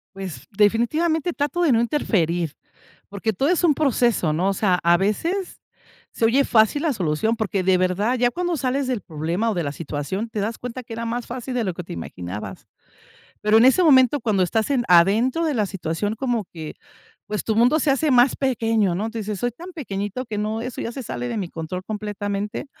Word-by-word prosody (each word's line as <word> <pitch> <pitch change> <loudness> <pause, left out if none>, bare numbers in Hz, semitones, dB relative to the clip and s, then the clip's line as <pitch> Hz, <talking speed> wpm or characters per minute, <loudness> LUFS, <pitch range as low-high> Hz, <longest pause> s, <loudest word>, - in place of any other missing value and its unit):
Pues, 190 -4 -7
definitivamente 295 - +1
trato 290 +5 -1
de 330 -6 +4
no 225 - +4
interferir, 175 - 0 0.6
porque 205 +2 -2
todo 270 - 0
es 360 0 +1
un 330 -4 +5
proceso, 240 - +1
¿no?, 180 +5 +1
o - - +1
sea, 185 -3 +1
a 170 0 +5
veces, 330 - -1 0.6
se 225 - +1
oye 260 +5 +4
fácil 225 +6 +3
la 310 -5 +1
solución, 185 +3 0
porque 200 -4 -1
de 185 0 +4
verdad, 185 +7 +1
ya 245 0 +4
cuando 355 -1 -1
sales 265 +1 0
del 250 -5 -1
problema 170 +8 -2
o - - 0
de 175 - -1
la 145 - -2
situación, 160 +8 -4
te 220 - -4
das 220 +2 -2
cuenta 250 +1 -6
que 230 -1 -9
era 230 +1 -4
más 235 +1 -3
fácil 250 +1 -6
de 240 - +1
lo 185 -4 -2
que 180 - -7
te - - -8
imaginabas, 90 +4 -7 0.7
pero 210 +1 +4
en 240 - +6
ese 315 +8 +5
momento, 270 -3 +5
cuando 215 -5 +1
estás 220 +8 0
en 255 -3 +2
adentro 215 - +4
de 310 - 0
la 215 -5 +1
situación 195 +3 -3
como 240 -4 -1
que, 160 -2 -7 0.5
pues, 210 0 -3
tu 220 -1 0
mundo 250 +7 +4
se 290 - +2
hace 285 +3 +2
más 250 0 +5
pequeño, 225 -7 +1
¿no?, 215 +5 -2
tu 230 - -10
dices: 210 -1 -4
"Soy 245 +3 -1
tan 350 +10 -10
pequeñito 215 - -4
que 215 - -5
no 215 +1 -2
eso 250 +1 -5
ya 230 - -4
se 265 - -6
sale 245 +1 -4
de 235 -2 -3
mi 190 -4 -3
control 165 +3 -5
completamente", 205 +1 -4
220 Hz, 215 wpm, -22 LUFS, 190-255 Hz, 0.7 s, en